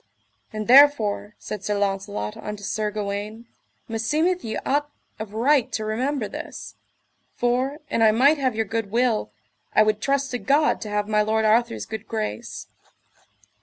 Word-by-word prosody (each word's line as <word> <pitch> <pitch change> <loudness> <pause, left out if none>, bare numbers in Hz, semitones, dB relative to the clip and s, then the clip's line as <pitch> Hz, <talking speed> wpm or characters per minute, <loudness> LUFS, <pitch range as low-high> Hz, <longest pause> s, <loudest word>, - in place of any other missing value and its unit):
And 215 -1 -5
therefore, 240 -6 +5
said 210 -2 -7
Sir 205 +1 -1
Launcelot 195 - -2
unto 210 -1 -7
Sir 215 +1 -1
Gawaine, 210 +2 -5 0.4
meseemeth 305 +11 0
ye 220 -1 -3
ought 290 +1 0 0.3
of 215 -1 -7
right 260 +2 +2
to 215 - -2
remember 245 +2 -1
this; - - -8 0.6
for, 255 +5 0
an 230 - -1
I 220 - +7
might 280 +7 +4
have 260 -4 0
your 225 0 0
good 225 0 -3
will, 235 0 +1 0.4
I - - +7
would 215 0 0
trust 275 0 0
to 245 - -2
God 290 +4 +2
to 215 - -5
have 210 0 -1
my 210 -1 +2
lord 220 +1 +1
Arthur's 230 +2 +2
good 220 0 -7
grace. 225 +1 -4
225 Hz, 160 wpm, -24 LUFS, 210-260 Hz, 0.6 s, I